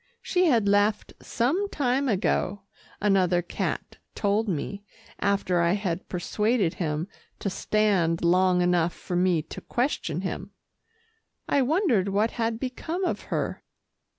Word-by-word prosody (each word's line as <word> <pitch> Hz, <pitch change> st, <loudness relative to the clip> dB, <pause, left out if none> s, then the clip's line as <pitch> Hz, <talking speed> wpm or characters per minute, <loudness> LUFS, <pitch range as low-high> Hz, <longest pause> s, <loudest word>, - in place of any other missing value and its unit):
She 365 Hz, -1 st, +2 dB
had 230 Hz, -8 st, +3 dB
left 205 Hz, +1 st, +2 dB
some 325 Hz, +13 st, 0 dB
time 270 Hz, -2 st, 0 dB
ago, 195 Hz, -1 st, 0 dB, 0.4 s
another 185 Hz, -4 st, +2 dB
cat -, -, -4 dB, 0.2 s
told 210 Hz, +1 st, +1 dB
me, 195 Hz, +4 st, -3 dB, 0.4 s
after 195 Hz, -3 st, +1 dB
I 170 Hz, +1 st, +3 dB
had 190 Hz, -4 st, -3 dB
persuaded 210 Hz, +1 st, 0 dB
him 155 Hz, 0 st, -2 dB, 0.3 s
to 200 Hz, -, -3 dB
stand 190 Hz, -6 st, +1 dB
long 180 Hz, +1 st, +4 dB
enough 175 Hz, -1 st, +2 dB
for 180 Hz, -, -6 dB
me 175 Hz, -3 st, +2 dB
to -, -, -9 dB
question 240 Hz, -, -1 dB
him. 195 Hz, +1 st, -5 dB, 0.9 s
I 280 Hz, -, +3 dB
wondered 260 Hz, -, +2 dB
what 210 Hz, +3 st, +1 dB
had 225 Hz, -1 st, -2 dB
become 315 Hz, +8 st, -3 dB
of -, -, -2 dB
her. -, -, -2 dB
200 Hz, 130 wpm, -26 LUFS, 180-230 Hz, 0.9 s, long